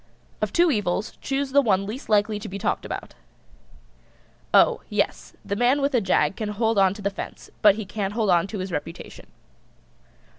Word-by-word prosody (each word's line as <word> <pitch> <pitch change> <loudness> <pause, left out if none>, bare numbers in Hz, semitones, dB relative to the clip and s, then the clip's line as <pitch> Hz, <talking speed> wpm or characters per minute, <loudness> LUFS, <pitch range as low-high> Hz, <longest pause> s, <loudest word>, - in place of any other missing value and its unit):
"] - - -34
Of - - 0
two 345 -1 +4
evils 205 -4 -1
choose 275 0 -2
the 280 +1 +5
one 195 -6 +1
least 225 +7 -7
likely 210 0 +2
to - - -7
be 195 - -5
talked - - -2
about. - - -6 1.4
Oh, - - +5
yes, - - -2
the 200 - -2
man 245 +6 +3
with 280 0 0
a 245 - +3
jag 190 0 +2
can 215 -2 -3
hold 220 0 +1
on 195 0 +4
to 205 - -10
the 200 - 0
fence, 195 - -8
but 205 -2 +6
he 220 -1 -5
can't 200 0 -3
hold 215 -3 +1
on 175 +1 +3
to 210 - -6
his 185 0 -4
reputation. 165 +1 -7
210 Hz, 195 wpm, -24 LUFS, 195-235 Hz, 1.4 s, but